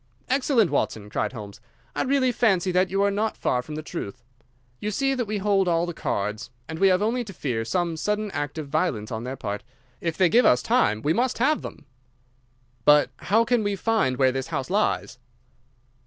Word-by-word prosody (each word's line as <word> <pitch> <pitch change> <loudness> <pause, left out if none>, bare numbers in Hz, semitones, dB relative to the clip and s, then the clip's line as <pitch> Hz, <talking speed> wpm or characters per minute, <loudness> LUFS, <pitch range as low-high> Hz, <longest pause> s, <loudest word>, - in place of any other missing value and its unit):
"Excellent, 255 - +2
Watson!" 105 -7 -1
cried - - -1
Holmes. 105 -3 -9 0.3
"I - - 0
really 265 -1 +2
fancy 195 -6 +2
that 180 +1 +2
you 195 +1 +1
are 200 - +3
not 215 +2 -1
far 125 - 0
from 150 +4 -8
the 155 - -5
truth. 125 - -6 0.6
You 210 - -2
see 270 +6 0
that 250 -3 -1
we 210 0 -2
hold 195 -1 +2
all 170 0 +2
the 175 - -5
cards, 105 -5 -3 0.2
and 160 0 -6
we 195 - +5
have 185 +1 +3
only 240 +3 0
to 210 - -9
fear 125 -9 -2
some 170 +6 -1
sudden 210 +5 -1
act 145 -1 -4
of 155 -2 -4
violence 140 -8 -1
on 115 +1 -4
their 130 +1 -4
part. 105 -2 -4 0.4
If 165 -2 -3
they 185 - +5
give 235 +8 +4
us 125 - +4
time 105 +1 +2
we 150 +2 +2
must 250 +4 0
have 290 +6 +2
them." - - -9 1.0
"But 150 -1 +5
how 225 +4 +2
can 245 -1 +2
we 205 -1 -1
find 195 - +1
where 130 -1 +4
this 135 0 -3
house 150 -1 -4
lies?" 190 -10 0
175 Hz, 205 wpm, -25 LUFS, 130-215 Hz, 1.0 s, we